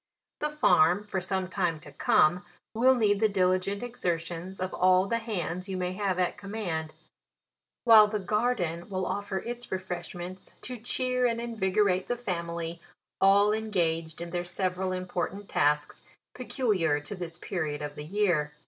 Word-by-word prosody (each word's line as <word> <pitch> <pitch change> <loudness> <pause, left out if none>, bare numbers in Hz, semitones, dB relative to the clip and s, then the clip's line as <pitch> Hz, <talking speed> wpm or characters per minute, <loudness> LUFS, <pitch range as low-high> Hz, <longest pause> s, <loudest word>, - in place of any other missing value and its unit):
The 300 - 0
farm, 205 - +4
for 195 -2 -3
some 190 0 -2
time 175 -4 -1
to 145 - -12
come, 155 +4 +3 0.3
will 255 +4 +5
need 205 -4 +2
the 220 0 +3
diligent 190 +2 +1
exertions 175 -5 -3
of 185 0 -3
all 185 +1 +4
the 230 +3 0
hands 185 -4 -4
you 190 - -2
may 180 0 -2
have 190 -2 -1
at 180 +2 0
command; 190 -7 -4 0.9
while 220 -3 +8
the 215 0 -2
garden 200 -4 -1
will 185 -1 -2
offer 200 0 -2
its 240 +4 -6
refreshments 180 0 -6
to 250 -1 -6
cheer 250 +2 0
and 230 -1 -1
invigorate 205 -5 +1
the 245 - -1
family, 170 -5 -4 0.4
all 200 +2 +5
engaged 170 -7 -1
in 170 0 -6
their 175 0 -1
several 185 +1 -2
important 185 +2 -3
tasks, 150 -1 +1 0.3
peculiar 210 - 0
to 150 - -6
this 175 -2 -6
pe 190 - -6
riod 150 -3 -2
of 145 - -7
the 150 - -7
year. 170 -5 +1
185 Hz, 155 wpm, -28 LUFS, 175-210 Hz, 0.9 s, while